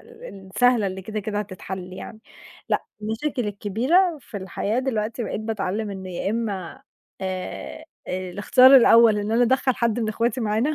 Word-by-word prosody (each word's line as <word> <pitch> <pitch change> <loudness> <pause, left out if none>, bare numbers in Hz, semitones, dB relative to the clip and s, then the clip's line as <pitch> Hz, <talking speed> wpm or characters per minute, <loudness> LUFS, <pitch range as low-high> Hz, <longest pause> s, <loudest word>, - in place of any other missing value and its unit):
ال 450 - -12
السهلة 245 -4 +4
اللي 190 0 -5
كده 215 +2 -4
كده 205 0 -3
هتتحل 185 -2 -6
يعني، 215 +4 -9 0.5
لأ - - 0 0.2
المشاكل 225 +2 -2
الكبيرة 255 - +1
في 235 - -10
الحياة، 200 +4 -2
دلوقتي 230 -3 -2
بقيت - - -4
باتعلّم 215 -1 -3
إن 190 -1 -7
يا 185 +2 -3
إما 205 -6 -4 0.4
آآ، 185 -1 -5 0.2
آآ، 185 0 -4
الاختيار 255 +8 +6
الأول 230 -3 +6
إن 205 +1 -3
أنا 235 +2 +3
أدَخّل 260 +1 +2
حدّ 235 0 0
من 220 - -1
اخواتي 235 +4 -1
معانا 225 +8 0
215 Hz, 160 wpm, -23 LUFS, 195-245 Hz, 0.5 s, الاختيار